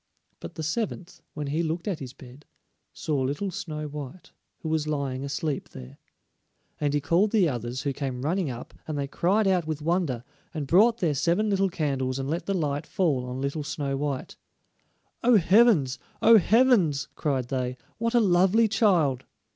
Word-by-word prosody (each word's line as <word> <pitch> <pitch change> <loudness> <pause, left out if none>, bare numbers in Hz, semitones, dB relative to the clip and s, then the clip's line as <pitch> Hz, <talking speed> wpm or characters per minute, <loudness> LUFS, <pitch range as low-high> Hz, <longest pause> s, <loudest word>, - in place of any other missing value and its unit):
But - - -9
the 160 - -5
seventh, 190 +1 -3
when 150 - -3
he 150 +4 -1
looked 165 +2 -3
at 190 -6 -2
his 130 -3 -7
bed, 130 +2 -15 0.4
saw 145 -4 -2
little 145 +9 -2
Snow 155 -3 -5
white, 150 +3 -8 0.3
who 160 - -3
was 155 -1 0
lying 140 -3 -2
asleep 145 +1 -3
there. 65 +2 -11 0.8
And 145 -1 0
he - - +3
called 170 +8 +2
the 200 -5 +3
others, 120 -2 -4
who 140 - -1
came 130 -2 -4
running 170 +1 0
up, 120 -1 -8
and 155 -2 -3
they 140 - -1
cried 190 +9 +1
out 180 -4 +1
with 155 -2 -2
wonder, 155 -6 -1 0.3
and 150 -2 -2
brought 220 - +4
their 165 -4 +2
seven 170 +9 +1
little 195 0 +2
candles 135 -6 -1
and 135 0 -3
let 165 +4 -3
the 195 - 0
light 145 -4 -2
fall 145 -9 0
on 125 +1 -5
little 140 +2 -2
Snow 140 -1 -3
white. 140 -1 -4 0.9
"Oh, 240 -1 +6
heavens! 185 - +4 0.2
oh, 225 -1 +7
heavens!" 200 - +3
cried 130 -5 -2
they, 130 -1 -2 0.2
"what 230 +1 0
a - - +6
lovely 195 +2 +4
child!" 175 - +2
155 Hz, 180 wpm, -26 LUFS, 135-185 Hz, 0.9 s, oh